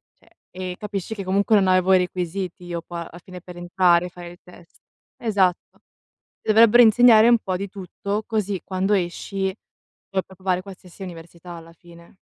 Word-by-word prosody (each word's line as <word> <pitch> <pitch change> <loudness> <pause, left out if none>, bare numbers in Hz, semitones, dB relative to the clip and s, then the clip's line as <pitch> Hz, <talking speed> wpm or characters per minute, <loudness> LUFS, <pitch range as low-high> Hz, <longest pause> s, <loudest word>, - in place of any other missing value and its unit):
Cioè - - -29 0.2
e, 185 -1 -6
capisci 210 +1 -5
che 200 - -6
comunque 200 +3 +2
non 195 -2 +3
avevo 185 +1 +3
i 185 - +6
requisiti 180 0 -4
io 170 -1 -5
qua, 170 0 -8
alla 175 - -13
fine 180 -1 -10
per 180 0 -12
entrare, 175 0 +2
fare 175 0 -11
il 175 - -15
test 180 -1 -18 0.4
esatto. 195 -6 -1 0.6
Dovrebbero 230 +2 +6
insegnare 225 0 +6
un 240 -1 +5
po' 185 -4 -3
di 200 +2 -5
tutto, 200 +2 -5
così 205 -4 -2
quando 190 +2 -1
esci 190 +1 -2 0.5
puoi 190 -1 -2
provare 185 -1 -3
qualsiasi 190 -1 -12
università 170 0 -11
alla 165 0 -11
fine. 170 +1 -18
185 Hz, 165 wpm, -22 LUFS, 175-200 Hz, 0.6 s, i